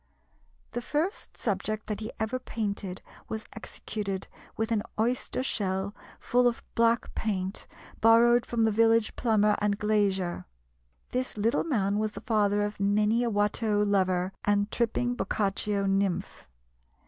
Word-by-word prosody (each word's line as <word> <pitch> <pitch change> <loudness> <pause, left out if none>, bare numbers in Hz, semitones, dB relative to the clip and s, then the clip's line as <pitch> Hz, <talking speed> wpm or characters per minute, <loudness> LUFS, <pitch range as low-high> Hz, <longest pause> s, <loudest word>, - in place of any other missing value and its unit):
The 240 - -3
first 320 - -3
subject 215 +1 -2
that 210 -2 -3
he 220 0 -5
ever 220 +4 -1
painted 200 -6 -4 0.3
was 220 0 -4
executed 205 -3 -5 0.3
with 220 +1 -1
an 220 -2 +2 0.2
oyster 245 +2 0
shell 195 -4 -1 0.3
full 245 0 +3
of 235 - -1
black 230 0 +2
paint, 195 -3 -3 0.3
borrowed 235 +2 +6
from 235 -1 0
the 220 - +3
village 225 +1 +3
plumber 210 -3 +3
and 205 -1 +1
glazier. 200 -4 0 0.6
This 255 -2 -2
little 225 +5 +2
man 205 -9 +1
was 215 0 -1
the 200 - -8
father 205 -2 +2
of 205 0 -4
many 210 +3 +2
a 240 - +1
Watteau 210 0 +1
lover 185 -2 +1
and 205 0 +1
tripping 245 +1 0
Boccaccio 205 -3 -1
nymph. 195 - -1
210 Hz, 135 wpm, -28 LUFS, 200-230 Hz, 0.6 s, borrowed